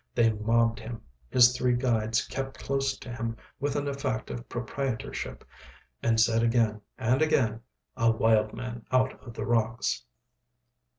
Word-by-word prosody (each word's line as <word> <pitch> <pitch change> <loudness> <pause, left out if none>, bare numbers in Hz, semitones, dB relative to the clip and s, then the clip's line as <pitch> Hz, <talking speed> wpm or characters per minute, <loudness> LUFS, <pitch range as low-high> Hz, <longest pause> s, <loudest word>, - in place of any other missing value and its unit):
They 115 -2 +4
mobbed 115 +2 +2
him. 115 0 -7 0.3
His 125 0 +6
three 125 0 +2
guides 115 -3 +1
kept 135 +1 -5
close 135 -1 -1
to 120 -2 -8
him 115 -1 -3 0.2
with 140 +1 -1
an 145 0 -1
effect 135 -5 -2
of 120 - -7
proprietorship, 120 - -4 0.6
and 115 -1 +2
said 115 0 +4
again 115 -2 +2 0.2
and 125 +5 +2
again, 120 -8 +2 0.3
"A 115 -2 +3
wild 110 -1 +3
man 120 -1 -6
out 130 0 +2
of 120 -3 -11
the 110 - -3
rocks." 115 +1 0
120 Hz, 145 wpm, -28 LUFS, 115-130 Hz, 0.6 s, His